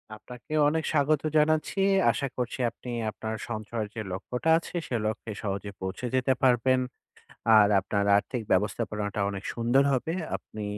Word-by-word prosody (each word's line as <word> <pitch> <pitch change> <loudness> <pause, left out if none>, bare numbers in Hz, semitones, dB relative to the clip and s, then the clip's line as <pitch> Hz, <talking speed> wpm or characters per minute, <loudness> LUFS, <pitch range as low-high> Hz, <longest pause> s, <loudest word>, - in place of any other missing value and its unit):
আপনাকেও 125 +7 -5
অনেক 160 +1 -1
স্বাগত 150 -1 +2 0.2
জানাচ্ছি। 155 +5 +2 0.3
আশা 140 - -2
করছি 125 +1 -3
আপনি 125 - -11 0.2
আপনার 110 +1 -5
সঞ্চয়ের 110 -1 -4
যে 110 - -3
লক্ষ্যটা 125 +11 -3
আছে 170 - -7
সে 120 - -2
লক্ষ্যে 110 +1 -4
সহজে 100 0 -3
পৌঁছে 95 +6 -4
যেতে 130 +1 +3
পারবেন। 130 0 +4 0.8
আর 105 -1 +7
আপনার 100 +1 -1
আর্থিক 120 +4 -2
ব্যবস্থাপনাটা 105 +1 0
অনেক 100 -1 -5
সুন্দর 120 +4 +3
হবে। 135 +5 -1 0.2
আপনি 110 - -9
120 Hz, 145 wpm, -27 LUFS, 105-135 Hz, 0.8 s, আর